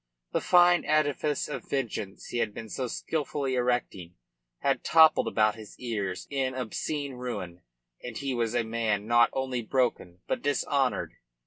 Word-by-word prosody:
The -, -, 0 dB
fine 175 Hz, -1 st, +5 dB
edifice 150 Hz, -1 st, +1 dB
of 150 Hz, -, -6 dB
vengeance 115 Hz, -7 st, -3 dB
he 120 Hz, -, -2 dB
had 105 Hz, -, -1 dB
been 110 Hz, -, -7 dB
so 130 Hz, +4 st, -3 dB
skilfully 140 Hz, +1 st, -2 dB
erecting 120 Hz, -8 st, -1 dB, 0.5 s
had 140 Hz, -, +1 dB
toppled 160 Hz, -1 st, +6 dB
about 105 Hz, 0 st, +3 dB
his 110 Hz, -1 st, -12 dB
ears 105 Hz, -7 st, -3 dB
in 135 Hz, -2 st, -1 dB
obscene 140 Hz, +4 st, -3 dB
ruin, 105 Hz, -9 st, -6 dB, 0.4 s
and 120 Hz, -2 st, -6 dB
he 140 Hz, -2 st, -2 dB
was 120 Hz, -1 st, -1 dB
a 120 Hz, -, +2 dB
man 110 Hz, -2 st, -1 dB
not 120 Hz, +1 st, +5 dB
only 130 Hz, -2 st, -2 dB
broken, 110 Hz, -7 st, -1 dB
but -, -, -2 dB
dishonoured. 140 Hz, -2 st, 0 dB
125 Hz, 150 wpm, -28 LUFS, 110-140 Hz, 0.5 s, toppled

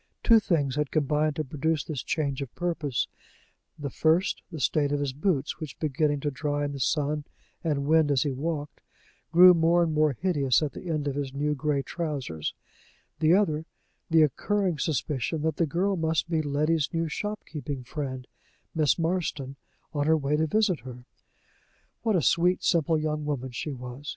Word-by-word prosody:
Two 230 Hz, -1 st, +7 dB
things 145 Hz, -9 st, 0 dB
had 150 Hz, -2 st, 0 dB
combined 150 Hz, 0 st, +1 dB
to 155 Hz, -, -1 dB
produce 150 Hz, +2 st, -1 dB
this 150 Hz, -5 st, -4 dB
change 145 Hz, -3 st, -2 dB
of 135 Hz, -4 st, -5 dB
purpose 160 Hz, -8 st, -1 dB, 0.7 s
the 140 Hz, -2 st, -5 dB
first, 165 Hz, +5 st, +2 dB
the 160 Hz, -, -6 dB
state 145 Hz, +2 st, +1 dB
of 145 Hz, -, +1 dB
his 140 Hz, -2 st, -2 dB
boots, 150 Hz, -1 st, -1 dB
which, 155 Hz, -3 st, -7 dB
beginning 150 Hz, -1 st, 0 dB
to 145 Hz, -, -1 dB
dry 145 Hz, +1 st, -1 dB
in 145 Hz, -, -3 dB
the 140 Hz, -, -6 dB
sun 150 Hz, +2 st, 0 dB, 0.4 s
and 145 Hz, -4 st, 0 dB
wind 155 Hz, 0 st, +4 dB
as 140 Hz, -3 st, +3 dB
he 145 Hz, -, -1 dB
walked, 145 Hz, +2 st, -4 dB, 0.5 s
grew 180 Hz, +2 st, +9 dB
more 170 Hz, +1 st, +4 dB
and 160 Hz, -2 st, 0 dB
more 155 Hz, -1 st, +3 dB
hideous 145 Hz, -7 st, +2 dB
at 150 Hz, -, -1 dB
the 180 Hz, -, -8 dB
end 155 Hz, -3 st, -1 dB
of 140 Hz, -, 0 dB
his 140 Hz, -1 st, -4 dB
new 150 Hz, +1 st, 0 dB
gray 145 Hz, -1 st, 0 dB
trousers; 140 Hz, -, -4 dB, 0.6 s
the 160 Hz, +2 st, +5 dB
other, 160 Hz, -6 st, +1 dB, 0.4 s
the 160 Hz, -1 st, +6 dB
occurring 185 Hz, -, 0 dB
suspicion 150 Hz, +1 st, -1 dB
that 160 Hz, -2 st, 0 dB
the 165 Hz, -, +2 dB
girl 190 Hz, +6 st, 0 dB
must 160 Hz, -1 st, 0 dB
be 165 Hz, -2 st, +1 dB
Letty's 150 Hz, +1 st, +1 dB
new 165 Hz, -1 st, -1 dB
shopkeeping 150 Hz, -7 st, -5 dB
friend, 130 Hz, -1 st, -5 dB, 0.5 s
Miss 155 Hz, -3 st, +2 dB
Marston, 165 Hz, -6 st, -2 dB, 0.4 s
on 145 Hz, -1 st, 0 dB
her 160 Hz, 0 st, +5 dB
way 145 Hz, 0 st, 0 dB
to 160 Hz, +1 st, +1 dB
visit 205 Hz, -3 st, +2 dB
her. 125 Hz, 0 st, -10 dB, 1.0 s
What 220 Hz, -3 st, +1 dB
a 170 Hz, -, +2 dB
sweet, 180 Hz, +5 st, +3 dB
simple 165 Hz, -1 st, +2 dB
young 155 Hz, 0 st, -2 dB
woman 135 Hz, -3 st, -3 dB
she 135 Hz, +5 st, -4 dB
was! 125 Hz, +2 st, -7 dB
150 Hz, 180 wpm, -27 LUFS, 140-165 Hz, 1.0 s, grew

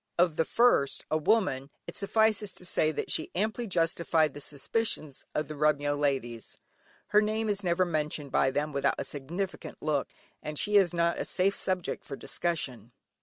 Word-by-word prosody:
Of 170 Hz, -2 st, +3 dB
the 160 Hz, -, +2 dB
first, 230 Hz, -, +3 dB
a 155 Hz, -, +3 dB
woman, 150 Hz, -8 st, +1 dB, 0.2 s
it -, -, -8 dB
suffices 215 Hz, -1 st, +1 dB
to 180 Hz, -, -7 dB
say 155 Hz, -3 st, +2 dB
that 155 Hz, -, -3 dB
she 155 Hz, -, +1 dB
amply 220 Hz, +5 st, -1 dB
justified 165 Hz, -4 st, +2 dB
the 145 Hz, -, -8 dB
suspicions 150 Hz, -, -3 dB
of 155 Hz, -, 0 dB
the 155 Hz, -, -6 dB
Remyo 145 Hz, -1 st, +2 dB
ladies. 135 Hz, -5 st, -2 dB, 0.5 s
Her 210 Hz, -, +5 dB
name 215 Hz, +1 st, -1 dB
is 205 Hz, -1 st, -1 dB
never 180 Hz, +1 st, +2 dB
mentioned 150 Hz, -4 st, -2 dB
by 135 Hz, -, +3 dB
them 145 Hz, +2 st, -2 dB
without 140 Hz, 0 st, +1 dB
a -, -, -2 dB
significant 170 Hz, +8 st, -5 dB
look, 150 Hz, -3 st, 0 dB, 0.3 s
and 150 Hz, 0 st, -5 dB
she 210 Hz, +6 st, +1 dB
is 190 Hz, -4 st, +6 dB
not 170 Hz, 0 st, +1 dB
a -, -, 0 dB
safe 195 Hz, +2 st, +2 dB
subject 185 Hz, -3 st, -1 dB
for 140 Hz, -, -7 dB
discussion. 130 Hz, -10 st, -2 dB
160 Hz, 175 wpm, -29 LUFS, 145-195 Hz, 0.5 s, is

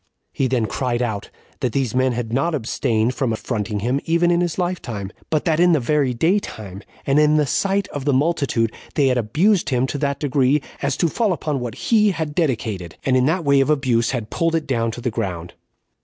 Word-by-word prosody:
He 135 Hz, -, 0 dB
then 125 Hz, -3 st, +1 dB
cried 125 Hz, +1 st, -1 dB
out, 105 Hz, -4 st, -3 dB, 0.3 s
that 125 Hz, -5 st, -1 dB
these 130 Hz, -5 st, 0 dB
men 130 Hz, 0 st, +2 dB
had 115 Hz, -1 st, -4 dB
not 155 Hz, +6 st, +1 dB
abstained 115 Hz, -2 st, 0 dB
from 130 Hz, -4 st, -1 dB
affronting 110 Hz, -2 st, -3 dB
him, 125 Hz, +5 st, 0 dB
even 170 Hz, +1 st, +2 dB
in 175 Hz, 0 st, +2 dB
his 175 Hz, -2 st, -1 dB
lifetime, 120 Hz, -, -3 dB, 0.2 s
but 155 Hz, -2 st, 0 dB
that 160 Hz, -2 st, +2 dB
in 175 Hz, 0 st, +5 dB
the 155 Hz, -, +3 dB
very 140 Hz, +1 st, +1 dB
day 165 Hz, -, +2 dB
time, 100 Hz, -, -8 dB, 0.2 s
and 140 Hz, +2 st, +3 dB
in 150 Hz, 0 st, +4 dB
the 150 Hz, -, +3 dB
sight 195 Hz, +8 st, 0 dB
of 145 Hz, -, -5 dB
the 145 Hz, -, +3 dB
multitude, 135 Hz, -5 st, +1 dB, 0.2 s
they 140 Hz, -3 st, +3 dB
had 125 Hz, -1 st, +2 dB
abused 170 Hz, -, +2 dB
him 125 Hz, -1 st, +1 dB
to 140 Hz, +2 st, -4 dB
that 140 Hz, -1 st, -1 dB
degree, 140 Hz, -1 st, +2 dB, 0.2 s
as -, -, -1 dB
to 170 Hz, -, +2 dB
fall 215 Hz, +5 st, 0 dB
upon 150 Hz, -4 st, -2 dB
what 120 Hz, -3 st, -5 dB
he 215 Hz, -2 st, +3 dB
had 160 Hz, -5 st, -3 dB
dedicated, 110 Hz, -, -2 dB
and 130 Hz, -, +2 dB
in 130 Hz, +1 st, +3 dB
that 165 Hz, +1 st, 0 dB
way 140 Hz, -1 st, +4 dB
of 135 Hz, -, +2 dB
abuse 125 Hz, -6 st, +2 dB
had 115 Hz, -5 st, -3 dB
pulled 165 Hz, 0 st, 0 dB
it 160 Hz, -, -1 dB
down 115 Hz, -3 st, 0 dB
to 115 Hz, +2 st, -6 dB
the 125 Hz, 0 st, -1 dB
ground. 90 Hz, -7 st, -4 dB
135 Hz, 220 wpm, -21 LUFS, 115-155 Hz, 0.3 s, in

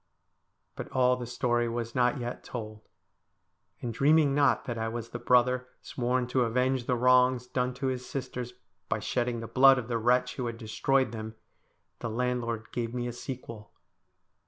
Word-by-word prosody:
' -, -, -49 dB
But -, -, -6 dB
all 125 Hz, -1 st, +3 dB
the 125 Hz, -1 st, -6 dB
story 120 Hz, -1 st, 0 dB
was 115 Hz, 0 st, -4 dB
not 125 Hz, +3 st, +2 dB
yet 120 Hz, 0 st, -5 dB
told; 110 Hz, -3 st, -8 dB, 0.9 s
and 120 Hz, -2 st, -3 dB
dreaming 145 Hz, +1 st, +4 dB
not 145 Hz, 0 st, +3 dB
that 120 Hz, -, -3 dB
I 115 Hz, -, -1 dB
was 115 Hz, 0 st, -5 dB
the 120 Hz, -, -6 dB
brother 125 Hz, +1 st, +3 dB, 0.2 s
sworn 125 Hz, 0 st, -1 dB
to 130 Hz, 0 st, +1 dB
avenge 125 Hz, +1 st, +1 dB
the 125 Hz, -, +2 dB
wrongs 125 Hz, 0 st, +4 dB
done 125 Hz, 0 st, -2 dB
to 130 Hz, +2 st, -4 dB
his 130 Hz, -1 st, -1 dB
sisters, 125 Hz, -2 st, -5 dB, 0.3 s
by -, -, +1 dB
shedding 120 Hz, -2 st, -1 dB
the 115 Hz, -, -6 dB
blood 135 Hz, +2 st, +6 dB
of 125 Hz, -2 st, -4 dB
the 115 Hz, -1 st, 0 dB
wretch 125 Hz, +2 st, +2 dB
who 125 Hz, -3 st, -2 dB
had 115 Hz, -1 st, -5 dB
destroyed 120 Hz, +3 st, 0 dB
them, 110 Hz, -1 st, -6 dB, 0.6 s
the 115 Hz, -, -4 dB
landlord 115 Hz, -1 st, -2 dB
gave 120 Hz, 0 st, -3 dB
me 120 Hz, -1 st, -2 dB
a 120 Hz, -, -4 dB
sequel. 115 Hz, -4 st, -8 dB
125 Hz, 180 wpm, -29 LUFS, 115-125 Hz, 0.9 s, blood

